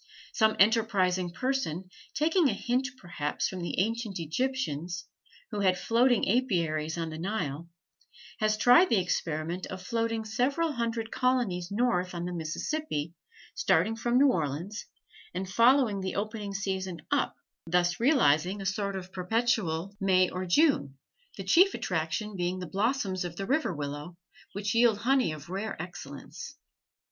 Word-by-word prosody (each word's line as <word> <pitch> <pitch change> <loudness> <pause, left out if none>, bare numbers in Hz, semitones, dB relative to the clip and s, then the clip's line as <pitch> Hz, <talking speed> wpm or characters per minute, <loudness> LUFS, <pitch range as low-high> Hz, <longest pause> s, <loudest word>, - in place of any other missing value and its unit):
Some 220 -2 +3
enterprising 195 -4 +3
person, 190 - -2 0.3
taking 320 +1 +3
a - - 0
hint 250 +5 0
perhaps 170 - -3
from 185 -1 -6
the 170 - -4
ancient 225 0 -1
Egyptians, 175 - -2 0.5
who 210 - -3
had 185 -2 +3
floating 240 +4 +3
apiaries 170 -9 0
on 165 -1 -3
the 155 - -6
Nile, 170 -5 -3 0.7
has 215 0 +2
tried 245 +11 +6
the 225 - +3
experiment 170 -1 -2
of 185 - -6
floating 225 +2 -1
several 275 +9 0
hundred 230 -3 -2
colonies 235 -9 0
north 200 -5 0
on 170 0 -3
the 180 - -4
Mississippi, 165 - -3 0.4
starting 225 - +2
from 240 +2 +1
New 280 +1 +6
Orleans 165 - -3 0.5
and 185 +1 -3
following 230 +1 +4
the 190 -1 -3
opening 205 -1 -3
season 190 -3 -3
up, - - +1 0.3
thus 175 +1 +1
realizing 200 - +3
a 195 - -6
sort 200 +1 -1
of 185 0 -7
perpetual 195 -3 0
May 185 -1 +3
or 185 +1 -4
June, 175 - +3 0.4
the - - -5
chief 375 +3 +5
attraction 180 +5 -2
being 180 0 -1
the 185 - -5
blossoms 200 - -1
of 175 -1 -5
the 195 - -4
river 285 0 +1
willow, 145 +2 -6 0.4
which 205 +2 -2
yield 230 -2 +4
honey 255 -3 +2
of 155 +2 -9
rare 195 +1 -4
excellence. 175 - -8
195 Hz, 145 wpm, -29 LUFS, 175-235 Hz, 0.7 s, tried